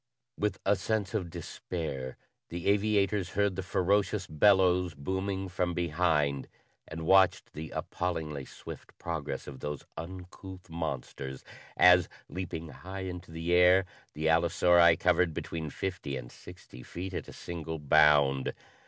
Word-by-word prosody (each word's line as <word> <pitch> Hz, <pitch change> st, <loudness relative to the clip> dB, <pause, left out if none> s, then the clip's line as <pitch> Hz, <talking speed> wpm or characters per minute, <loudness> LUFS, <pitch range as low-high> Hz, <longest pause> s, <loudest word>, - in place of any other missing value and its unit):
With 105 Hz, -2 st, -1 dB
a 100 Hz, -, +4 dB
sense 100 Hz, +1 st, -1 dB
of 95 Hz, -6 st, -2 dB
despair, 70 Hz, -7 st, -5 dB, 0.3 s
the 85 Hz, +1 st, -6 dB
aviators 100 Hz, -2 st, +2 dB
heard 100 Hz, -2 st, +2 dB
the 95 Hz, -, -2 dB
ferocious 95 Hz, +1 st, +1 dB
bellows 90 Hz, 0 st, +3 dB
booming 95 Hz, +5 st, -2 dB
from 90 Hz, -1 st, -1 dB
behind 75 Hz, -5 st, +1 dB, 0.4 s
and 80 Hz, 0 st, -6 dB
watched 95 Hz, +1 st, +4 dB
the 80 Hz, +1 st, -6 dB
appallingly 80 Hz, -5 st, -3 dB
swift -, -, -11 dB
progress 75 Hz, -5 st, -4 dB
of 65 Hz, -3 st, -9 dB
those 75 Hz, 0 st, -5 dB
uncouth 90 Hz, +1 st, -9 dB
monsters 70 Hz, -4 st, -5 dB, 0.3 s
as, 90 Hz, -1 st, +7 dB, 0.2 s
leaping 85 Hz, -3 st, -5 dB
high 95 Hz, +5 st, -8 dB
into 90 Hz, -1 st, -6 dB
the 80 Hz, +1 st, -2 dB
air, 90 Hz, +2 st, +6 dB, 0.3 s
the 80 Hz, +1 st, -3 dB
allosauri 85 Hz, +1 st, +5 dB
covered 90 Hz, -2 st, +2 dB
between 80 Hz, -2 st, -4 dB
fifty 80 Hz, -5 st, -4 dB
and -, -, -8 dB
sixty -, -, -13 dB
feet 90 Hz, +7 st, -6 dB
at -, -, -4 dB
a -, -, -9 dB
single 80 Hz, -1 st, -5 dB
bound. 75 Hz, -2 st, +4 dB
85 Hz, 135 wpm, -30 LUFS, 80-95 Hz, 0.4 s, as